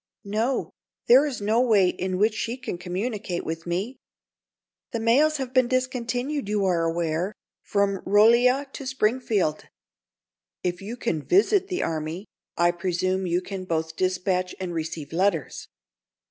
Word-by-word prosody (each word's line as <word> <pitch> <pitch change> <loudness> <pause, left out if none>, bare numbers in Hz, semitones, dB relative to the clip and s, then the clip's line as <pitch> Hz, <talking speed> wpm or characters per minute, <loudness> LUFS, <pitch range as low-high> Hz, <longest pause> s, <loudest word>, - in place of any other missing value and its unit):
"No. 220 +6 -1 0.3
There 265 +5 +6
is 255 -7 -5
no 220 +4 +2
way 210 -7 +4
in 185 +1 -3
which 215 +3 +3
she 230 +3 -3
can 180 -8 -5
communicate 190 +1 -3
with 165 +1 -5
me. 195 +9 -2 1.0
The 230 - -1
mails 280 +8 +3
have 260 -2 -5
been 255 -2 +4
discontinued, 255 +1 -1
you 210 -2 +1
are 170 -3 +2
aware, 170 +3 -1 0.3
from 200 -2 0
Rolla 235 +7 +5
to 275 - -7
Springfield." 220 -10 0 1.0
"If 180 0 -2
you 220 +5 -6
can 175 -11 -1
visit 390 - +3
the 365 -2 -2
army, 160 +4 -3 0.3
I 175 0 +4
presume 185 +2 -1
you 175 +1 +1
can 190 0 -6
both 160 -2 -2
dispatch 185 0 0
and 185 -2 -4
receive 160 -2 -5
letters. 180 -3 0
200 Hz, 145 wpm, -25 LUFS, 175-245 Hz, 1.0 s, There